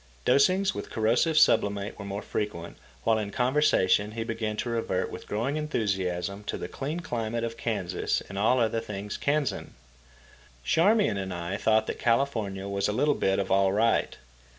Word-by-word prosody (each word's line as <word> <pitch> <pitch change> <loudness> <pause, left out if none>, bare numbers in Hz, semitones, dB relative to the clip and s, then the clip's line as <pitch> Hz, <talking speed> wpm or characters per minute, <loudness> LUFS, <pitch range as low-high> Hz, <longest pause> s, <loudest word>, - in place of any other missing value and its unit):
Dosings 185 +10 +3
with - - -6
corrosive 120 +9 +1
sublimate 100 -8 +3
were 100 - -6
more 100 +1 -5
frequent, 85 -5 -4 0.3
while, 110 -1 +3
in 105 -2 -3
conversation, 115 -5 +2
he 115 0 -3
began 115 -1 -3
to 120 - -2
revert 115 -5 -1
with - - -9
growing 120 +8 -1
enthusiasm 100 -9 -2
to - - -3
the - - -5
clean 150 +5 -4
climate 115 -6 -3
of 115 0 -3
Kansas 100 -7 -1
and 100 - -10
all 110 +6 +3
other 115 -1 +1
things 105 -1 -6
Kansan. 145 0 -1 0.9
Charmian 195 - +3
and 95 -1 -4
I 85 +2 -4
thought 110 +1 +2
that - - -5
California 115 -6 0
was 100 0 -1
a - - 0
little 145 +6 +2
bit 95 -7 +1
of 100 - -2
all 95 0 +4
right. 115 +3 +1
110 Hz, 170 wpm, -27 LUFS, 100-125 Hz, 0.9 s, all